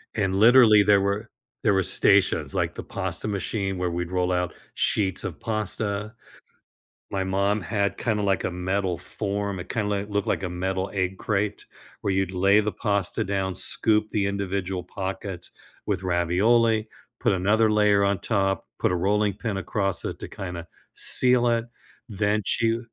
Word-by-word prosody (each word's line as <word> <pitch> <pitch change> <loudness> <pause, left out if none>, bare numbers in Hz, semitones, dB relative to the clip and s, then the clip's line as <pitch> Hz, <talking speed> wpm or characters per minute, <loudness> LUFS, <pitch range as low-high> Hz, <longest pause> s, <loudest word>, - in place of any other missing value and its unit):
and 95 -3 0
literally, 110 -2 +7
there 100 0 +4
were 100 +3 -2 0.3
there 105 - +3
were 95 -1 +2
stations, - - +3
like, - - -1
the - - -6
pasta - - -4
machine 100 -1 -2
where 90 -1 0
we'd 85 0 -3
roll 90 0 0
out 90 -1 -1 0.2
sheets 95 -3 +1
of 95 -5 -5
pasta. 105 -1 -2 1.0
My 95 -1 -1
mom 100 +2 0
had 100 +2 -1
kinda 110 -3 -1
like 100 -2 0
a - - 0
metal 90 0 -1
form, 100 +1 -3
it 90 - -9
kinda, 110 -4 -1
like, 100 0 -2
looked 100 -1 -1
like - - -1
a - - -1
metal 95 +2 -3
egg 95 -1 -1
crate 105 0 -2 0.4
where 100 - 0
you'd 95 -1 0
lay 100 +3 +4
the 105 0 -1
pasta 100 -3 -1
down, 95 -1 -2
scoop 110 -1 +3
the 100 -2 0
individual 100 -2 -2
pockets 95 -1 -5 0.4
with 95 -3 -1
ravioli, 105 +6 +2 0.3
put - - +1
another 105 +4 +2
layer 105 -1 +3
on 100 -1 +1
top, 95 -3 -1
put - - +1
a - - +1
rolling 100 +3 +1
pin 110 0 -4
across 95 0 -2
it - - -4
to - - -6
kinda 90 -3 -7 0.3
seal 125 -1 +4
it, 115 -1 +1 0.5
then 105 +1 0
she 115 +3 +1
100 Hz, 170 wpm, -25 LUFS, 95-105 Hz, 1.0 s, literally